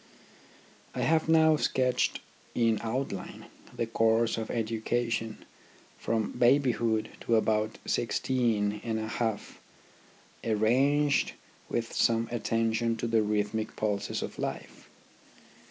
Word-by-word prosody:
I - - -2
have 160 0 +2
now 160 -1 +5
sketched 130 -3 +1 0.3
in 115 -3 +2
outline 115 -4 -4 0.3
the 115 - 0
course 115 0 +2
of 110 -1 -4
education 115 0 -2 0.5
from 110 -2 -1
babyhood 120 -4 +2
to 115 - +1
about 110 0 +1
sixteen 110 -3 0
and 115 -1 -2
a 110 0 -3
half, 110 -2 -3 0.8
arranged 135 +7 +2 0.4
with 115 -1 -2
some 115 0 +2
attention 115 0 0
to 115 - -3
the 115 -1 +2
rhythmic 105 +1 -1
pulses 105 -2 -2
of - - -7
life. - - -6
115 Hz, 105 wpm, -29 LUFS, 110-120 Hz, 0.8 s, now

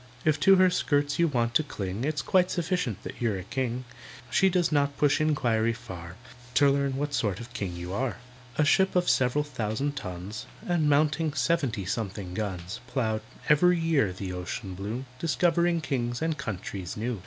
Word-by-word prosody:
"If 155 -1 +3
to 195 +5 +7
her 185 -1 +5
skirts 145 -4 +1
you 170 - +5
want 120 -5 0
to 155 - +5
cling, 105 -5 -4
It's 150 0 -1
quite 185 -1 +3
sufficient 175 - -1
that - - -8
you're 110 -5 +1
a 90 - -6
king; 125 +2 -2 0.5
She 190 - +4
does 175 -2 +1
not 140 -1 +1
push 145 0 +3
inquiry 115 -7 +2
far 90 -8 -9 0.4
To 140 0 +6
learn 140 -1 0
what 145 +1 -2
sort 105 -8 0
of 120 +1 -10
king 100 -7 -3
you 90 +1 -6
are." 130 +4 -1 0.4
A 150 - +4
ship 190 +6 +3
of 180 -1 +2
several 130 +3 +3
thousand 130 +1 -2
tons, 95 -3 -6 0.2
And 170 -4 +2
mounting 150 +1 +2
seventy 130 - 0
something 100 -2 -3
guns, 95 0 -4
Ploughed, 110 -5 -1 0.3
every 180 +4 +5
year, 155 - +2
the 95 0 -5
ocean 90 +2 -5
blue, 105 +8 -4
Discovering 170 +1 +2
kings 120 -5 -2
and 160 -1 0
countries 100 -8 -5
new. 115 0 -2
130 Hz, 175 wpm, -28 LUFS, 105-155 Hz, 0.5 s, to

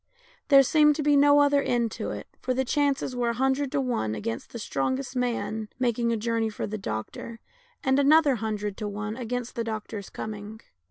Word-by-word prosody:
There 275 -2 +8
seemed 300 +2 +4
no 290 0 +6
other 285 0 +4
end 235 -4 0
to - - -4
it, - - -5 0.2
for 255 0 -1
the 265 +1 0
chances 280 -1 0
were 240 -1 0
a - - 0
hun 265 +2 +2
dred 280 0 -3
to 290 - +2
one 235 - -1
against 115 +2 -5
the - - -6
strongest 255 - -2
man 230 -3 -2
making 240 -2 +1
a 230 - +1
jour 230 +1 -1
ney 225 0 +1
for 215 - -4
the 215 +1 -5
doctor, 150 - -5 0.4
and 265 0 +3
another 285 -1 +5
hundred 210 -2 -3
to 210 - -3
one 210 +1 -4
against 245 0 -4
the 235 - -2
doctor's 215 -2 -5
coming. 215 0 -7
240 Hz, 200 wpm, -26 LUFS, 215-270 Hz, 0.4 s, There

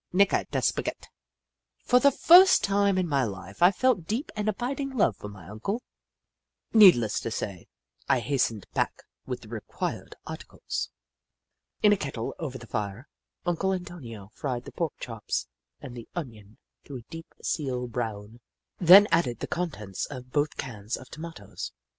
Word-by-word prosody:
Nica 200 +2 +3
da - - -1
spaghett! - - -2 0.4
" - - -60
For 250 - +5
the 280 - +6
first 355 +7 +7
time 200 -1 +2
in 185 -1 +1
my 140 -3 +2
Hfe, 100 - -5
I 175 +2 +8
felt 200 -5 +1
deep 235 +8 -2
and 210 0 0
abiding 265 +5 -3
love 120 - +3
for 105 - -8
my 95 -5 -12
Uncle. 155 - -4 0.9
Needless 180 - +7
to - - -4
say, 100 -5 -5 0.4
I - - +4
hastened 120 -5 0
back - - -1 0.2
with 125 -1 -4
the 110 - -13
required 110 -2 -5
articles. - - -5 0.9
In 210 -1 +7
a - - +1
kettle, 135 -8 -4
over 135 -5 -4
the 120 - -11
fire, 105 +4 -4 0.4
Uncle 185 +2 +1
Antonio 125 - -7
fried 125 -3 -4
the - - -9
pork 165 -3 -2
chops 115 -3 -3 0.4
and 125 -2 -8
the 120 -2 -10
onion 110 - -7 0.3
to 140 - -8
a 125 - -7
deep 165 -1 -9
seal 130 -5 -1
brown, 115 -2 -5 0.4
then 185 +3 +9
added 130 -8 +2
the - - -3
contents 105 - -4
of 125 -3 -9
both 145 +2 0
cans 110 -3 -4
of 130 - -13
tomatoes. 110 - -8
135 Hz, 160 wpm, -27 LUFS, 110-185 Hz, 0.9 s, then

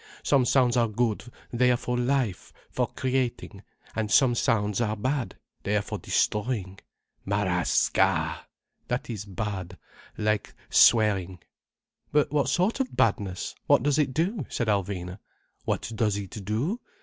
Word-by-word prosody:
Some 135 -3 +3
sounds 125 -1 +3
are 120 -1 +3
good, 110 0 -1 0.3
they 125 +1 +3
are 125 - +3
for 125 +1 -3
life, 125 -5 -1 0.2
for - - 0
creating, 125 -6 -2 0.3
and 110 -1 -1
some 125 +3 +5
sounds 110 -4 +1
are 110 -2 0
bad, 130 +4 -2 0.2
they 105 - -1
are 105 - -1
for - - -5
destroying. 105 -4 -1 0.4
Ma 100 +1 0
rà 90 -1 +1
sca!—that 125 0 -1
is 105 -3 -5
bad, 95 -2 -5 0.4
like 105 -1 -1 0.2
swearing." 100 -5 +4 0.7
"But 150 -1 +2
what 145 -3 +1
sort 185 - +1
of 265 -1 -3
badness? 100 -4 0
What - - +5
does 145 +1 +2
it 145 -3 +2
do?" 175 - -1
said 120 - -2
Alvina. 95 -2 -2 0.5
"What - - -2
does 105 -2 +1
it 100 +1 -7
do? 125 - -1
115 Hz, 145 wpm, -27 LUFS, 100-130 Hz, 0.7 s, some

